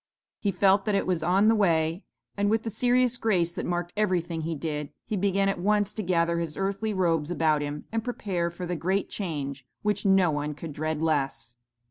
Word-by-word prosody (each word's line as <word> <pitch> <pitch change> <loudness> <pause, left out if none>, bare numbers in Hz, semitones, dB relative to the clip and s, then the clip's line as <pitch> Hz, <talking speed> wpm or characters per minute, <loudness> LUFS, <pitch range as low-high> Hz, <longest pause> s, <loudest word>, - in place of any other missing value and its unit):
He 205 - 0
felt 195 +1 +3
that 210 -2 +1
it 195 - +1
was 180 -3 0
on 190 +5 +3
the 225 - +6
way, 170 -4 +2 0.3
and 205 0 +1
with 220 +1 +1
the 225 - -3
serious 245 +2 +2
grace 180 -8 +1
that - - -4
marked 175 0 -2
everything 180 -5 0
he 165 +1 -2
did, 150 -1 -3 0.2
he 215 - -2
began 195 0 +1
at 195 -2 0
once 205 +2 +1
to 215 - -3
gather 170 -2 +1
his 165 -3 -4
earthly 195 +3 -1
robes 165 -6 +1
about 160 -3 +2
him 145 0 -4
and 225 0 -1
prepare 190 -8 -2
for 175 +1 -6
the 175 0 -2
great 190 +4 -1
change 145 -8 -4 0.2
which 210 -1 0
no 190 -4 +4
one 150 0 -2
could 150 +1 -7
dread 155 +1 -2
less. 135 -6 -1
180 Hz, 205 wpm, -27 LUFS, 160-205 Hz, 0.3 s, the